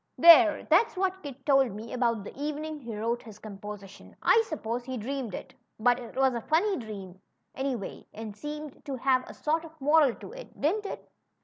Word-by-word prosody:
There! 335 -1 +8
that's 370 +5 +4
what 380 0 0
Kit 275 -2 -9
told 270 -6 +4
me 220 +3 -7
about 235 -4 +1
the - - -9
evening 300 +2 -4
he 235 -5 -7
wrote 230 +3 -1
his 220 -3 -12
composition. 205 -2 -10
I 450 - +6
suppose 240 -5 -3
he 260 +1 -5
dreamed 245 -2 -4
it; 260 - -8 0.3
but 245 +2 +3
it 240 -2 -10
was 265 -1 +3
a 235 - -3
funny 360 - +2
dream, 195 -5 -8 0.3
any 265 -1 -1
way, 200 -5 -7
and 215 -1 -7
seemed 300 +3 -7
to 275 - -3
have 255 0 +2
a - - -10
sort 320 +2 0
of 320 -1 -13
moral 290 -2 +4
to - - -10
it. - - -11
Didn't 400 +8 +1
it - - -7
265 Hz, 200 wpm, -28 LUFS, 225-310 Hz, 0.3 s, There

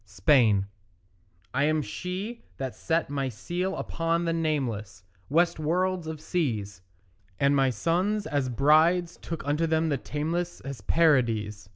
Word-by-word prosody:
SPAIN 105 -2 +3 0.9
I 140 +3 +2
am 155 0 +1
she 185 - -5 0.2
that 130 -2 -4
set 165 -3 -1
my 135 -2 -1
seal 180 - -3
upon 165 +1 -1
the 165 - +1
nameless 130 - -2 0.3
West 165 +3 +2
worlds 180 +2 0
of 160 -1 -5
seas; 110 - -2 0.6
And 140 +1 +3
my 135 -1 +3
sons 180 - 0
as 140 -3 -1
brides 160 +7 +3
took 165 -4 -6
unto 150 +3 +1
them 160 0 +1
the 140 -3 0
tameless 170 +5 -3
Hesperides. 115 -6 +1
155 Hz, 135 wpm, -27 LUFS, 130-170 Hz, 0.9 s, SPAIN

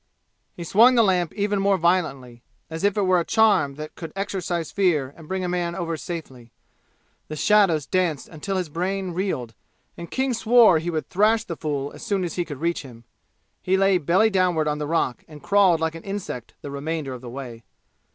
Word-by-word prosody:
He 170 - -7
swung 230 +9 +5
the 230 - +5
lamp 180 -5 +1
even 205 -1 0
more 195 0 +2
violently, 145 -9 -1 0.3
as 160 +2 -5
if 205 0 +2
it 205 - +2
were 185 -1 +3
a - - 0
charm 210 -10 +3
that 155 +1 -8
could 165 - -8
exorcise 180 -4 -3
fear 155 -9 +1
and 160 -2 -14
bring 190 +1 -3
a - - -1
man 175 -1 -2
over 170 -3 -3
safely. 135 -8 -8 0.8
The 155 - -6
shadows 175 -5 +3
danced 175 -6 -1
until 190 +5 -4
his 180 -2 -2
brain 185 +4 -3
reeled, 165 - -3 0.4
and 170 0 -9
King 265 -1 -1
swore 225 -6 +5
he 165 +2 -4
would 160 -2 -3
thrash 215 +3 +2
the 170 - -6
fool 145 -3 -3
as - - -12
soon 195 -2 -1
as 175 - -3
he 175 - -2
could 145 -3 -8
reach 170 +1 0
him. 120 -4 -13 0.6
He 190 +1 +1
lay 195 -1 +3
belly 185 +8 +3
downward 180 -5 +1
on 150 0 -1
the 150 - -3
rock 150 -6 -1
and 150 -2 -13
crawled 195 -5 +4
like 160 0 0
an 165 - -9
insect 195 - -6
the 145 - -6
remainder 145 -1 -4
of 125 - -8
the 125 - -8
way. 120 -3 -8
170 Hz, 205 wpm, -23 LUFS, 150-195 Hz, 0.8 s, swung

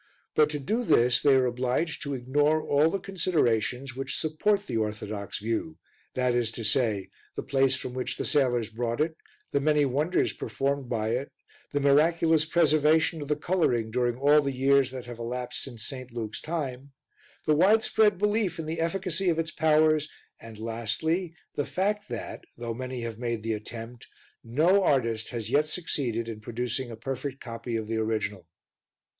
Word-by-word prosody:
But 150 -1 +4
to 150 - -2
do 215 - -1
this 125 - +4
they 140 -2 +5
are 130 -1 +4
obliged 125 +6 -1
to 140 -2 -3
ignore 145 +5 +2
all 145 +3 +3
the 195 - -1
considerations 140 - 0
which 135 +1 -3
support 200 +6 +1
the 115 - -2
orthodox 105 -1 -3
view, 115 +9 -3 0.4
viz. 120 -3 +1
the 110 -3 -1
place 135 -1 +3
from 130 -1 -5
which 130 0 -3
the - - -3
sailors 125 -6 +1
brought 115 +1 -2
it, 160 +1 +1 0.4
the 140 - +2
many 150 0 +3
wonders 150 +7 +1
performed 140 -2 -2
by 110 -2 -1
it, 125 +5 -2 0.4
the 145 - 0
miraculous 155 +3 +4
preservation 160 0 +3
of 145 - -5
the 150 - +1
colouring 145 -9 0
during 120 0 0
all 145 +3 +5
the 140 -1 -1
years 135 0 +3
that 130 -2 -7
have 120 -1 -8
elapsed 125 +1 -4
since 120 -5 -7
St. 130 -2 -6
Luke's 115 -2 -5
time, 140 -4 -4 0.5
the 155 - +4
widespread 210 +3 +4
belief 210 0 +1
in 165 - -4
the 160 +1 -3
efficacy 185 +1 0
of 165 - +1
its 165 -1 -1
powers 155 -1 +3 0.3
and 115 -1 -11
lastly 140 - -2 0.2
the 145 - -1
fact 205 +2 -1
that, - - -6
though 115 -1 -4
many 130 +1 -5
have 115 -1 -5
made 115 -3 -2
the 115 0 -1
attempt, 115 +2 -7 0.4
no 160 +12 +3
artist 115 -8 +1
has 115 -2 -4
yet 150 +2 +3
succeeded 130 -9 -2
in 110 -2 -6
producing 120 +3 -3
a 115 - -6
perfect 135 +3 -4
copy 115 0 -5
of 110 -1 -2
the 115 0 -2
original. 105 -5 -2
135 Hz, 170 wpm, -27 LUFS, 115-155 Hz, 0.5 s, they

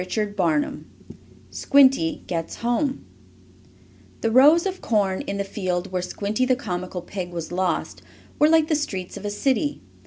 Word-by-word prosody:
CHAPTER 185 -6 0
IV - - -9 0.7
SQUINTY 265 - +3
GETS 165 -2 -4
HOME 245 +4 -1 1.2
The 225 - 0
rows 295 - +6
of 380 -1 -3
corn, 200 -4 0
in 200 - -3
the 200 - -1
field 185 -2 -3
where 180 -1 -1
Squinty 205 +6 -2
the 255 0 +3
comical 180 -7 -5
pig 185 -3 -6
was 170 -2 -6
lost, 185 0 -2 0.4
were 300 - +5
like 320 -1 +4
the 315 - +1
streets 190 -12 -4
of 205 - -8
a - - -1
city. 270 +7 -1
205 Hz, 155 wpm, -23 LUFS, 180-265 Hz, 1.2 s, rows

